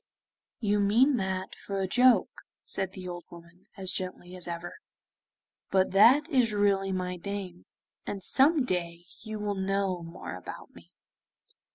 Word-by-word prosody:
'You 210 Hz, -2 st, +1 dB
mean 240 Hz, +7 st, +4 dB
that 190 Hz, -2 st, -3 dB
for 195 Hz, -1 st, -5 dB
a 190 Hz, -, -1 dB
joke,' 250 Hz, +5 st, +3 dB, 0.2 s
said 190 Hz, -1 st, -2 dB
the 185 Hz, -1 st, -8 dB
old 175 Hz, -1 st, -6 dB
woman, 170 Hz, +1 st, -15 dB
as 190 Hz, -2 st, -2 dB
gently 185 Hz, -1 st, -4 dB
as 180 Hz, -, -11 dB
ever, 170 Hz, 0 st, -6 dB, 0.9 s
'but 190 Hz, -1 st, +2 dB
that 250 Hz, +10 st, +6 dB
is 250 Hz, -8 st, +2 dB
really 200 Hz, -1 st, +2 dB
my 180 Hz, -1 st, -3 dB
name, 185 Hz, -1 st, -6 dB, 0.4 s
and 195 Hz, -2 st, -4 dB
some 280 Hz, -, +5 dB
day 175 Hz, -4 st, -3 dB, 0.2 s
you 215 Hz, -1 st, -6 dB
will 210 Hz, -1 st, -2 dB
know 195 Hz, -1 st, -1 dB
more 165 Hz, -, -8 dB
about 90 Hz, -, -10 dB
me. -, -, -17 dB
195 Hz, 150 wpm, -28 LUFS, 180-210 Hz, 0.9 s, that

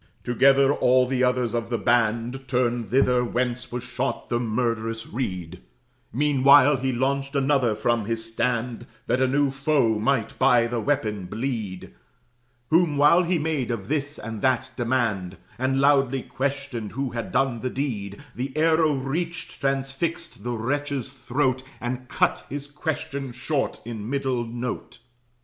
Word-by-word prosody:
Together, 135 Hz, +3 st, +4 dB
all 130 Hz, -2 st, +4 dB
the 130 Hz, 0 st, 0 dB
others 125 Hz, -2 st, +1 dB
of 115 Hz, -1 st, -2 dB
the 120 Hz, -, 0 dB
band 120 Hz, +3 st, +1 dB
Turned 120 Hz, -2 st, 0 dB
thither, 125 Hz, -1 st, +3 dB
whence 125 Hz, +1 st, -2 dB
was 120 Hz, 0 st, -4 dB
shot 125 Hz, +2 st, -3 dB
the 120 Hz, -, +1 dB
murderous 115 Hz, -1 st, -1 dB
reed; 90 Hz, -7 st, -4 dB, 0.5 s
Meanwhile 140 Hz, +1 st, +5 dB
he 130 Hz, +1 st, -1 dB
launched 135 Hz, +3 st, -1 dB
another 135 Hz, -5 st, +2 dB
from 115 Hz, 0 st, 0 dB
his 115 Hz, +1 st, -1 dB
stand, 120 Hz, 0 st, -1 dB, 0.2 s
That 125 Hz, +2 st, +1 dB
a 130 Hz, -, +4 dB
new 140 Hz, +1 st, +2 dB
foe 135 Hz, -5 st, +1 dB
might 115 Hz, 0 st, 0 dB
by 125 Hz, -3 st, +5 dB
the 120 Hz, 0 st, -2 dB
weapon 110 Hz, -7 st, -1 dB
bleed, 110 Hz, -3 st, -4 dB, 0.8 s
Whom 165 Hz, -3 st, +3 dB
(while 150 Hz, +5 st, +6 dB
he 180 Hz, 0 st, +1 dB
made 150 Hz, -5 st, -1 dB
of 110 Hz, -4 st, -4 dB
this 145 Hz, 0 st, -1 dB
and 110 Hz, -1 st, -6 dB
that 130 Hz, 0 st, +1 dB
demand, 115 Hz, -7 st, -1 dB, 0.2 s
And 130 Hz, +1 st, +1 dB
loudly 135 Hz, -2 st, +3 dB
questioned 135 Hz, -5 st, -3 dB
who 135 Hz, +1 st, -2 dB
had 115 Hz, -1 st, -4 dB
done 130 Hz, -2 st, +1 dB
the 130 Hz, -, -2 dB
deed) 105 Hz, -8 st, -4 dB
The 130 Hz, +4 st, -5 dB
arrow 160 Hz, -1 st, +3 dB
reached 165 Hz, +6 st, -4 dB
transfixed 135 Hz, +1 st, -2 dB
the 120 Hz, 0 st, -2 dB
wretch's 135 Hz, +2 st, -2 dB
throat 130 Hz, -1 st, 0 dB, 0.2 s
And 125 Hz, +1 st, -4 dB
cut -, -, +1 dB
his 140 Hz, +1 st, -5 dB
question 140 Hz, -3 st, -4 dB
short 135 Hz, +3 st, -2 dB
in 110 Hz, -2 st, -6 dB
middle 130 Hz, -3 st, -1 dB
note. 120 Hz, +2 st, -5 dB
130 Hz, 150 wpm, -25 LUFS, 120-140 Hz, 0.8 s, while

